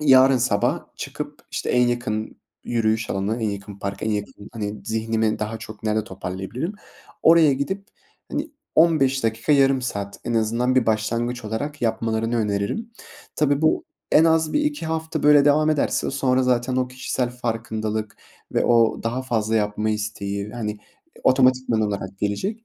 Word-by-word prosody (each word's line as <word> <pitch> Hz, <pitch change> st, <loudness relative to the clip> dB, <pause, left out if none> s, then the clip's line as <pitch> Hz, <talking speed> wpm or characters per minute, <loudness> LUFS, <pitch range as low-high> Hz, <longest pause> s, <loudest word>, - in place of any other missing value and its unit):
Yarın 135 Hz, -2 st, +6 dB
sabah 115 Hz, -4 st, +1 dB
çıkıp, -, -, -6 dB
işte, -, -, -2 dB
en 125 Hz, 0 st, +4 dB
yakın 120 Hz, -3 st, -2 dB, 0.3 s
yürüyüş 110 Hz, -1 st, 0 dB
alanı, 105 Hz, +4 st, -1 dB
en 110 Hz, -, +1 dB
yakın 100 Hz, 0 st, -7 dB
park, 100 Hz, 0 st, -5 dB
en 110 Hz, -, 0 dB
yakın 105 Hz, -1 st, -3 dB, 0.2 s
Hani, 105 Hz, -3 st, -4 dB
zihnimi 110 Hz, 0 st, 0 dB
daha 110 Hz, +1 st, -3 dB
çok 110 Hz, -1 st, -10 dB
nerede 110 Hz, 0 st, +1 dB
toparlayabilirim? 95 Hz, -, -5 dB, 0.5 s
Oraya 165 Hz, -3 st, +6 dB
gidip, 190 Hz, +10 st, -3 dB, 0.4 s
hani, -, -, -2 dB, 0.2 s
15 135 Hz, -6 st, +4 dB
dakika, 115 Hz, +6 st, +1 dB
yarım 135 Hz, -2 st, +4 dB
saat 100 Hz, -5 st, -4 dB
en 120 Hz, -, -2 dB
azından 115 Hz, +3 st, +1 dB
bir 130 Hz, -3 st, +3 dB
başlangıç 115 Hz, +2 st, -1 dB
olarak 145 Hz, +8 st, -4 dB
yapmalarını 115 Hz, 0 st, 0 dB
öneririm. 105 Hz, -, -1 dB, 0.5 s
Tabii 145 Hz, 0 st, +2 dB
bu 155 Hz, -, +2 dB, 0.3 s
en 160 Hz, -, +7 dB
az 160 Hz, -1 st, +3 dB
1-2 295 Hz, -, 0 dB
hafta 160 Hz, 0 st, -2 dB
böyle 145 Hz, -1 st, +6 dB
devam 155 Hz, +2 st, +4 dB
ederse 150 Hz, -2 st, 0 dB
sonra 130 Hz, -1 st, +1 dB
zaten 125 Hz, 0 st, +1 dB
o 130 Hz, -1 st, +1 dB
kişisel 125 Hz, -1 st, -2 dB
farkındalık 110 Hz, -3 st, -3 dB, 0.4 s
ve -, -, +2 dB
o 115 Hz, -1 st, +3 dB
daha 120 Hz, +3 st, -2 dB
fazla 115 Hz, -3 st, 0 dB
yapma 105 Hz, 0 st, 0 dB
isteği, 100 Hz, -1 st, -3 dB
hani, 105 Hz, -3 st, -4 dB, 0.5 s
otomatikman 130 Hz, -3 st, +3 dB
olarak 100 Hz, -2 st, -3 dB
gelecek. 195 Hz, -, -2 dB
115 Hz, 150 wpm, -23 LUFS, 110-135 Hz, 0.5 s, en